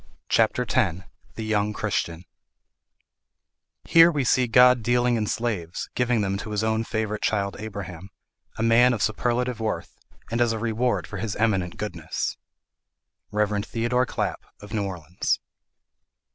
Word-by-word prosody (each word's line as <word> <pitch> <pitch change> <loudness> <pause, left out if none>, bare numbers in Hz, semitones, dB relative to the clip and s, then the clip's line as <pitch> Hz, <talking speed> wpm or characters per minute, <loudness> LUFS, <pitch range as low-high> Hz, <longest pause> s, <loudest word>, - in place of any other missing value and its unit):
CHAPTER 115 +2 +2
X 95 -9 +1 0.3
THE 110 - -5
YOUNG 105 -1 0
CHRISTIAN 85 -3 -2 1.6
"Here 165 0 +7
we 145 -4 0
see 125 0 +3
God 125 +1 +6
dealing 120 +1 +2
in 110 -2 -1
slaves; 100 -7 -3
giving 125 -2 +1
them 100 0 -1
to 105 - -6
his 105 0 -1
own 110 0 +1
favourite 110 -2 -2
child 100 -2 0
[Abraham], 100 -4 -7 0.5
a 110 - -1
man 120 +2 +5
of 110 - -1
superlative 120 +2 0
worth, 110 -1 -3 0.4
and 115 +1 0
as 120 -1 +3
a - - -2
reward 115 +2 0
for - - -7
his 110 -4 -3
eminent 95 -6 0
goodness." 85 -6 -3 1.0
Rev. 105 -1 0
Theodore 120 +3 0
Clapp, - - -2 0.2
of 105 +2 -11
New 105 -2 0
Orleans. 90 -1 -2
110 Hz, 145 wpm, -25 LUFS, 100-120 Hz, 1.6 s, Here